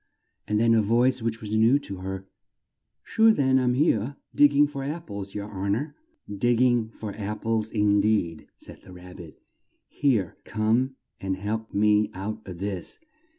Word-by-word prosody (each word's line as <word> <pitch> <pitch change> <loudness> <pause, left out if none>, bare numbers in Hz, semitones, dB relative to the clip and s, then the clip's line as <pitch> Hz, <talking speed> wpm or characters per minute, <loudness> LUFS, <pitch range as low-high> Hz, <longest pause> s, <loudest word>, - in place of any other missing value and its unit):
And 105 0 +1
then 115 0 +4
a 110 - +4
voice 120 +4 +2
which 115 0 -3
was 110 0 -3
new 115 +5 +5
to 100 -9 -7
her, 95 +1 -6 0.8
"Sure 225 0 +4
then, 130 -8 +3
I'm 125 -1 +1
here! 135 -3 +1 0.2
Dig 145 - +6
ging 145 +1 +4
for 140 -2 -6
apples, 110 - -6
yer 105 0 -4
hon 100 0 -1
or!" 145 +6 -5 0.3
"Dig 115 +4 +1
ging 120 -2 +2
for 110 -2 -7
ap 105 0 -5
ples, 110 -1 -1
in 105 -2 +3
deed!" 100 -6 0
said - - -12
the 90 - -14
Rab 90 0 -12
bit. 80 -6 -12 0.5
"Here! 120 - 0
Come 115 +5 0 0.2
and 95 0 -2
help 110 +3 -4
me 105 0 +3
out 105 +3 -5
of 90 -2 -7
this! 95 -1 -4
110 Hz, 175 wpm, -26 LUFS, 100-125 Hz, 0.8 s, Dig